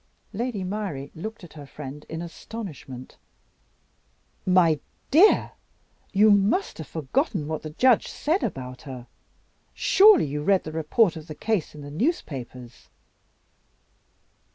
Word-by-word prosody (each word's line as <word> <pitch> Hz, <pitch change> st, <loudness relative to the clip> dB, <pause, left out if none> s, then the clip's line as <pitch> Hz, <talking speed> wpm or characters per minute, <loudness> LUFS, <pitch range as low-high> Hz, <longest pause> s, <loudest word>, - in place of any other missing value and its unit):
Lady 225 Hz, -2 st, -2 dB
Myrie 185 Hz, -8 st, -4 dB
looked 220 Hz, +6 st, -7 dB
at 175 Hz, -, -12 dB
her 145 Hz, -3 st, -10 dB
friend 145 Hz, +1 st, -9 dB
in 160 Hz, +1 st, -5 dB
astonishment. 165 Hz, -, -9 dB, 1.3 s
"My 175 Hz, -4 st, +4 dB, 0.3 s
dear, 350 Hz, +10 st, +5 dB, 0.6 s
you 210 Hz, +2 st, +5 dB
must 205 Hz, -, +2 dB
have 160 Hz, -, -6 dB
forgotten 165 Hz, -, -1 dB
what 155 Hz, 0 st, -3 dB
the 155 Hz, -, -6 dB
judge 245 Hz, +9 st, +3 dB
said 330 Hz, +6 st, -1 dB
about 130 Hz, -1 st, -5 dB
her. 130 Hz, -5 st, -8 dB, 0.7 s
Surely 405 Hz, -3 st, +6 dB
you 145 Hz, +1 st, -3 dB
read 190 Hz, +4 st, +3 dB
the 155 Hz, -, -6 dB
report 160 Hz, +5 st, +2 dB
of 160 Hz, 0 st, -9 dB
the 155 Hz, -, -7 dB
case 210 Hz, -7 st, -1 dB
in 150 Hz, -, -9 dB
the 145 Hz, 0 st, -9 dB
newspapers?" 135 Hz, -, -4 dB
165 Hz, 130 wpm, -25 LUFS, 145-220 Hz, 1.3 s, Surely